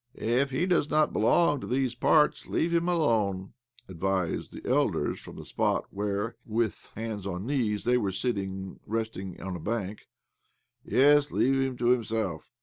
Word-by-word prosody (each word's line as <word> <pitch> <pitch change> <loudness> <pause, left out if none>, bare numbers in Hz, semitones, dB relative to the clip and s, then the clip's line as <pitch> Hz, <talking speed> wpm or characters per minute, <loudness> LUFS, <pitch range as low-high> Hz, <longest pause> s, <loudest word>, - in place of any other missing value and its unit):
"If 125 +5 +1
he 135 +7 0
does 175 -5 +2
not 155 0 +2
belong 145 +5 +3
to - - -6
these 130 -1 0
parts, 150 +4 +3
leave 170 +1 0
him 170 +1 +2
alone," 110 - +1 0.3
advised 95 -1 -2
the - - -9
elders - - +1
from - - -11
the - - -9
spot - - 0
where, 105 +3 -2
with 110 -1 -2
hands 110 -3 -4
on 90 +1 -4
knees, 115 -6 0
they 125 +1 +3
were 100 -4 -1
sitting 95 -3 -3
resting 110 -4 -4
on 95 -1 -5
a - - -5
bank. 105 +2 -4 0.4
" - - -48
Yes, 145 +2 +4
leave 135 +1 +2
him 130 -2 -1
to 120 0 +1
himself. 110 -8 0
115 Hz, 165 wpm, -28 LUFS, 100-135 Hz, 0.4 s, Yes